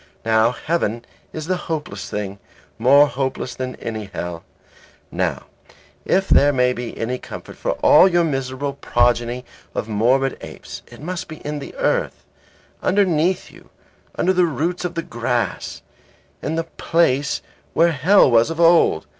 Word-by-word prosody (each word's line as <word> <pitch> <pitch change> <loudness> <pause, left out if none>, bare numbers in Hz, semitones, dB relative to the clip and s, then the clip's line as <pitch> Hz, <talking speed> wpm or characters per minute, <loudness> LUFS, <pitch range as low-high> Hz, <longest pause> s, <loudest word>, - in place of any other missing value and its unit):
Now, 110 0 +4
heaven 120 -4 -2 0.3
is 155 -1 -6
the 185 +2 0
hopeless 155 -2 -4
thing, 100 -1 -4 0.4
more 140 +3 +6
hopeless 130 -2 -3
than 130 0 -5
any 110 -2 -5
hell. 85 -3 -6 0.7
Now, - - -1 0.6
if 195 +1 +2
there 145 +1 +5 0.2
be 120 -1 -6
any 125 +3 -2
comfort - - -9
for - - -2
all - - +7
your 175 -2 +3
miserable 135 -2 -2
progeny 120 -2 0 0.3
of 110 - -2
morbid 125 +5 +1
apes, - - -9
it - - -14
must 180 +1 -4
be 155 - -8
in 150 0 -3
the 140 - -9
earth, - - -1 0.6
underneath 185 -2 +1
you, - - -17 0.5
under 185 - +2
the 180 -1 +4
roots 170 +4 -2
of 175 -1 -4
the 165 - -2
grass, 120 -1 -3 0.6
in 155 - -2
the 165 - 0
place 155 -4 0 0.3
where 170 +1 +4
hell 160 +1 +4
was 115 +4 +4
of 165 0 -5
old. 165 - +4
140 Hz, 145 wpm, -21 LUFS, 120-165 Hz, 0.7 s, all